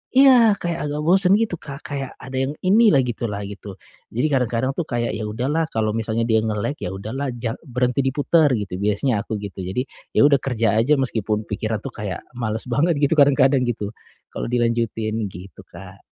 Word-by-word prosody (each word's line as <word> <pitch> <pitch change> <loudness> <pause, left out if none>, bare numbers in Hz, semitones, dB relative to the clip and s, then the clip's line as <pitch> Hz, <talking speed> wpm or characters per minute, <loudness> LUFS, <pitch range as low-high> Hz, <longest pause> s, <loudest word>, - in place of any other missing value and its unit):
iya, 255 -5 +7
kayak 170 -3 -3
agak 150 +1 -3
bosen 185 +3 +5
gitu 215 -6 0
Kak, 140 -1 -9
kayak 135 -2 -5
ada 130 0 -7
yang 135 +2 -1
ini 215 +5 +5
lah, 140 -9 +5
gitu 120 -1 -3
lah, 105 -1 -4
gitu. 100 0 -8 0.4
Jadi, 125 +6 +2
kadang-kadang 125 -1 +1
tuh 155 +4 -4
kayak, 120 -2 -1
ya 110 -1 -4
udahlah 135 +9 -1
kalau 110 -6 -1
misalnya 115 +1 -1
dia 110 -1 +3
nge-lag, 110 +5 -2
ya - - -4
udahlah 110 +9 -4
jang 115 -1 -4
berhenti 125 +1 0
diputer, 145 +4 +3
gitu. 100 -4 -4
Biasanya 105 +3 +1
aku 110 - -2
gitu. 100 -1 -7
Jadi, 95 +7 -2 0.3
ya - - +5
udah 145 -1 +5
kerja 115 -4 +1
aja 140 +7 +3
meskipun 110 -5 -1
pikiran 110 +1 -3
itu 135 - -5
kayak, 105 -5 -5
males 115 -3 -3
banget 160 +7 +2
gitu, 140 - +3
kadang-kadang 135 -2 +4
gitu, 105 -4 -3 0.4
kalau - - -4
dilanjutin 115 -2 -1
gitu, 95 +1 -11
Kak. - - -13
120 Hz, 190 wpm, -22 LUFS, 110-140 Hz, 0.4 s, iya